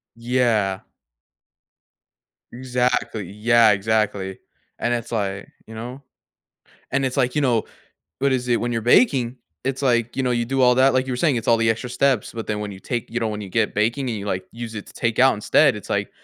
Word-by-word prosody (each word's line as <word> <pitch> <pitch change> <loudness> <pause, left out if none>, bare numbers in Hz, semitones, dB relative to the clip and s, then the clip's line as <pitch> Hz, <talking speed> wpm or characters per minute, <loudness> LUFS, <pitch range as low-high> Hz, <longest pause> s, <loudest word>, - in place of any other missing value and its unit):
Yeah. 115 -5 +1 1.7
Exactly, 125 -5 -1
yeah, 115 +2 +4
exactly. 100 -2 0 0.4
And 120 - 0
it's 120 0 -5
like, 100 -3 -2 0.2
you 110 - -11
know? 125 +5 -7 0.9
And 135 0 +1
it's 130 +1 -2
like, 125 0 +1
you 150 - +1
know, 120 -5 +2 0.6
what 140 0 +2
is 125 -1 -1
it 120 - +2
when 120 0 -2
you're 115 -1 -1
baking, 125 - +3 0.3
it's 135 +1 -2
like, 120 -3 +1
you 135 - -1
know, 125 - +1
you 120 -1 0
do 135 +2 0
all 125 -1 +5
that, 130 +1 +4
like 130 0 +2
you 130 - -2
were - - -3
saying, 145 -2 +2
it's 115 - -4
all 115 - +5
the 115 0 +2
extra 115 +2 -2
steps, 130 -2 +1
but 115 -1 -6
then 105 -1 -2
when 105 -1 -4
you 95 - -10
take 120 0 -4
you 120 +1 -2
know, 115 - -1
when 105 -1 -4
you 100 - -8
get 105 +2 0
baking 120 +5 0
and 110 - -2
you 100 - -6
like 95 -2 -3
use 115 -1 -7
it 105 - -6
to - - -14
take 115 0 -1
out 130 +1 +6
instead, 105 - +3
it's - - -10
like, - - -1
120 Hz, 220 wpm, -22 LUFS, 110-125 Hz, 1.7 s, out